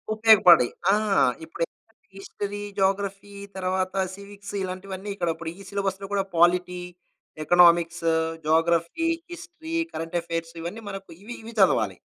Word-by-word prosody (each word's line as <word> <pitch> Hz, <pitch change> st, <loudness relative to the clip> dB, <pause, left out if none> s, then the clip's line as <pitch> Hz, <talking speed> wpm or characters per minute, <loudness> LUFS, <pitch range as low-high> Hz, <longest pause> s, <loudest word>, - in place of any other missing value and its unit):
ఉపయోగపడ్డాయి. 210 Hz, -, +6 dB, 0.2 s
ఆ! 205 Hz, -, +5 dB, 0.5 s
ఇప్పుడెప్పుడైతే 215 Hz, +8 st, -8 dB
history, 205 Hz, +1 st, -6 dB, 0.2 s
geography 195 Hz, +1 st, -1 dB, 0.2 s
తర్వాత 185 Hz, 0 st, -1 dB, 0.2 s
సివిక్స్ 200 Hz, 0 st, -11 dB
ఇలాంటివన్నీ 190 Hz, +2 st, -6 dB
ఇక్కడ 175 Hz, -3 st, -1 dB
ఇప్పుడు 165 Hz, -1 st, -6 dB
ఈ -, -, -10 dB
సిలబస్‌లో 195 Hz, -1 st, -3 dB
కూడా 195 Hz, -1 st, +1 dB
polity, 180 Hz, +1 st, +3 dB, 0.6 s
economics 170 Hz, -1 st, +4 dB, 0.4 s
geography, 170 Hz, -, +2 dB, 0.3 s
history, 335 Hz, -2 st, -8 dB, 0.2 s
current 165 Hz, +2 st, -3 dB
affairs 165 Hz, 0 st, -4 dB
ఇవన్నీ 180 Hz, +7 st, -6 dB
మనకు 195 Hz, -1 st, -8 dB
ఇవి, 240 Hz, +2 st, -7 dB
ఇవి 230 Hz, +1 st, -9 dB
చదవాలి. 110 Hz, -, +3 dB
190 Hz, 120 wpm, -25 LUFS, 170-200 Hz, 0.6 s, ఉపయోగపడ్డాయి